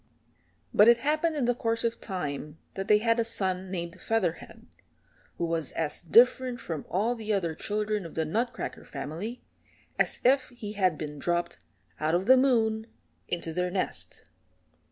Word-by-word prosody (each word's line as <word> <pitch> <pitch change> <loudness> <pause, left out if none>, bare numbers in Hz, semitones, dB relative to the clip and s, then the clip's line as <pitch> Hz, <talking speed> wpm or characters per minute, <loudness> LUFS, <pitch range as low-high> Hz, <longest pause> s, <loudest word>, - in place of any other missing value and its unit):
But 210 - +7
it 235 0 +8
happened 310 +5 +1
in 280 -5 0
the 245 - +3
course 230 -1 0
of 230 0 -1
time 150 -5 -4 0.2
that 195 0 -4
they 210 - +6
had 230 +2 +2
a - - +3
son 190 -4 -1
named 175 -1 -5
Featherhead, 200 -7 -2 0.7
who 170 - 0
was 165 -3 -2
as 160 -2 -1
different 245 +6 +4
from 160 -4 -5
all 215 +6 +1
the 220 -2 -4
other 180 -6 0
children 210 +3 -2
of 165 - -9
the 160 - 0
Nutcracker 225 +10 -3
family 160 - -6 0.6
as - - +2
if 265 +1 +4
he 225 -4 -7
had 185 -6 +1
been 150 -2 -6
dropped 175 +3 -1 0.4
out 155 +2 +1
of 180 +2 0
the 260 +4 +8
moon 225 -4 +2 0.4
into 170 -2 -3
their 180 +2 0
nest. 185 +1 -4
205 Hz, 165 wpm, -28 LUFS, 170-230 Hz, 0.7 s, it